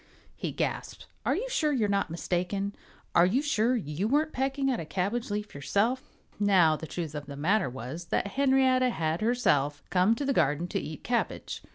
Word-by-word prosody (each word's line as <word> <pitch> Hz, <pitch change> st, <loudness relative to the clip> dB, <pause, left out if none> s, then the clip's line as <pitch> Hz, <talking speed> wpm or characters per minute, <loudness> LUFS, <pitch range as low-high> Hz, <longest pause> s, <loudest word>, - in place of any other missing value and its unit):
he -, -, -3 dB
gasped. -, -, -3 dB, 0.2 s
"Are -, -, +3 dB
you -, -, -2 dB
sure 330 Hz, -12 st, +1 dB
you're 235 Hz, -7 st, +1 dB
not 200 Hz, -2 st, 0 dB
mistaken? 180 Hz, +4 st, -2 dB, 0.4 s
Are 170 Hz, +1 st, +6 dB
you 225 Hz, +8 st, +2 dB
sure 250 Hz, -4 st, +2 dB
you 175 Hz, -2 st, -2 dB
weren't 300 Hz, +5 st, +1 dB
pecking 270 Hz, +1 st, 0 dB
at 245 Hz, -, -1 dB
a -, -, -3 dB
cabbage 200 Hz, +9 st, -2 dB
leaf 210 Hz, 0 st, -3 dB
yourself?" 225 Hz, -, -1 dB, 0.2 s
Now, 185 Hz, -6 st, +5 dB
the 160 Hz, -, -7 dB
truth 160 Hz, 0 st, -4 dB
of 145 Hz, -1 st, -6 dB
the 140 Hz, -, -7 dB
matter 185 Hz, +4 st, +2 dB
was 130 Hz, +7 st, -6 dB
that 200 Hz, -, -1 dB
Henrietta 260 Hz, -2 st, +3 dB
had 160 Hz, -5 st, -1 dB
herself 145 Hz, -, +1 dB
come 185 Hz, +5 st, +4 dB
to 285 Hz, -, -3 dB
the 275 Hz, -, +1 dB
garden 150 Hz, -, +1 dB
to -, -, -1 dB
eat 155 Hz, -1 st, -7 dB
cabbage. 240 Hz, 0 st, -2 dB
200 Hz, 190 wpm, -28 LUFS, 160-255 Hz, 0.4 s, Are